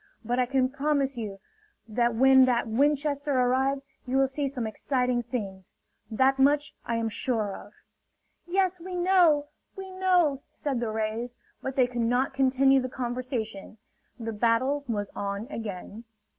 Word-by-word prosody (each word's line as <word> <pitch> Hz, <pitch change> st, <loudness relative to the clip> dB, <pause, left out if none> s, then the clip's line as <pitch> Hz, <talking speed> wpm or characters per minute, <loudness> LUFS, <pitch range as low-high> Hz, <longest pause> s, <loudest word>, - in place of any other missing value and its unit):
But 245 Hz, +2 st, 0 dB
I 250 Hz, -, +2 dB
can 260 Hz, 0 st, +2 dB
promise 280 Hz, 0 st, 0 dB
you 210 Hz, -4 st, -5 dB, 0.5 s
that 235 Hz, +1 st, +1 dB
when 265 Hz, +2 st, +6 dB
that 240 Hz, -2 st, +1 dB
Winchester 285 Hz, +4 st, +1 dB
arrives, 265 Hz, +2 st, +1 dB, 0.2 s
you 260 Hz, +2 st, 0 dB
will 270 Hz, -, +5 dB
see 275 Hz, +1 st, -2 dB
some 260 Hz, -4 st, -4 dB
exciting 250 Hz, +2 st, 0 dB
things. 200 Hz, -6 st, -6 dB, 0.4 s
That 265 Hz, +4 st, +2 dB
much 290 Hz, +2 st, +3 dB
I 235 Hz, -, -2 dB
am 230 Hz, 0 st, 0 dB
sure 220 Hz, -3 st, -1 dB
of!" 205 Hz, -, -12 dB, 0.7 s
"Yes, 370 Hz, 0 st, +1 dB
we 365 Hz, +1 st, -6 dB
know! 350 Hz, -5 st, +3 dB, 0.3 s
We 385 Hz, -1 st, -8 dB
know!" 360 Hz, -7 st, +2 dB
said 280 Hz, -5 st, -3 dB
the 235 Hz, -2 st, -2 dB
rays. 220 Hz, +3 st, -3 dB, 0.3 s
But 265 Hz, 0 st, -4 dB
they 255 Hz, -, +4 dB
could 245 Hz, -1 st, -3 dB
not 245 Hz, +4 st, +1 dB
continue 270 Hz, 0 st, +4 dB
the 255 Hz, -, -4 dB
conversation: 240 Hz, -5 st, -4 dB, 0.4 s
the 225 Hz, -1 st, -4 dB
battle 240 Hz, +6 st, +1 dB
was 205 Hz, -4 st, -3 dB
on 200 Hz, +1 st, -3 dB
again. 215 Hz, -1 st, -6 dB
255 Hz, 155 wpm, -27 LUFS, 230-280 Hz, 0.7 s, when